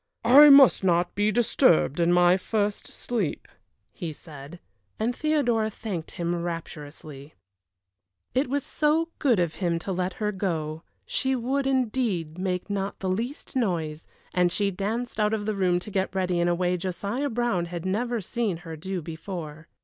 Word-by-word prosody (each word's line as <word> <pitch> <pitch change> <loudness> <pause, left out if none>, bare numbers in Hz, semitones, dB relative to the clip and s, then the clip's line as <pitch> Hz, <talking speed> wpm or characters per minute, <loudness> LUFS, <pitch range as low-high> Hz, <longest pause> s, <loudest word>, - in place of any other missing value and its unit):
"I 285 +5 +9
must 275 -7 +7
not 175 -1 +2
be 205 +1 +1
disturbed 215 - +3
in 170 0 +3
my 175 0 +5
first 205 +1 -2
sleep," 220 -10 -3 0.5
he 170 -3 -5
said; 150 +2 -11 0.4
and 235 +3 0
Theodora 245 -8 +1
thanked 200 -6 -6
him 170 0 -2
rapturously. 155 -3 -7 1.0
It 260 +1 +1
was 285 0 -1
so 315 +2 +1
good 245 - +3
of 170 -3 0
him 170 -2 +1
to 180 +4 -5
let 185 0 -1
her 210 -1 -2
go 160 -6 -3 0.2
she 265 0 0
would, 265 +3 -1
indeed, 220 - -1
make 180 -1 -2
not 200 -1 -3
the 190 - -2
least 235 +10 -4
noise, 165 -10 -1 0.3
and 180 -1 +3
she 200 +2 0
danced 220 +6 -3
out 210 +1 +2
of 205 -1 -4
the 215 - 0
room 185 -3 +2
to 210 - -8
get 190 -1 -1
ready 180 -2 0
in 175 - +2
a 175 - +2
way 180 0 0
Josiah 200 +10 -3
Brown 235 -7 0
had 170 0 -6
never 230 +4 -1
seen 210 -2 -2
her 165 -1 -6
do 180 +2 -5
before. 160 -1 -7
190 Hz, 165 wpm, -26 LUFS, 170-235 Hz, 1.0 s, I